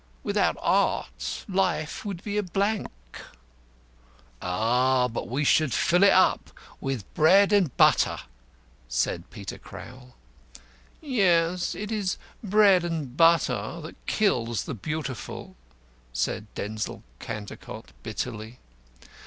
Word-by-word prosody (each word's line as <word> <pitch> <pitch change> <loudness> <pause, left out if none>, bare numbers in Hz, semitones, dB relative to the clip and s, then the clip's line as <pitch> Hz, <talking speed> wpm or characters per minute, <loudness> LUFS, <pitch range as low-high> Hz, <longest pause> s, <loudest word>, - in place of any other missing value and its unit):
Without - - +1
art 60 +1 0
life 185 -5 -1
would 195 -5 -5
be 205 -1 -4
a 210 - +2
blank." 200 +3 -1 1.5
"Ah, 125 +7 +2
but 115 -1 -5
we 135 +5 0
should 155 0 +3
fill 175 0 +3
it 200 - +7
up 185 - +3 0.3
with 135 -7 -4
bread 195 +6 +5
and 185 -10 +2
butter," - - +4 0.7
said - - -1
Peter - - -8
Crowl. 125 0 -12 0.9
"Yes, 180 - +2
it 210 +1 -5
is 205 -4 -1 0.3
bread 200 -3 +5
and 160 -7 -3
butter 165 -6 +3
that 160 - -11
kills 120 - +1
the - - -5
Beautiful," 135 -2 -5 0.6
said 105 - -2
Denzil 105 +1 -4 0.2
Cantercot, 105 -2 -8
bitterly. 110 +3 -5
155 Hz, 110 wpm, -26 LUFS, 115-190 Hz, 1.5 s, it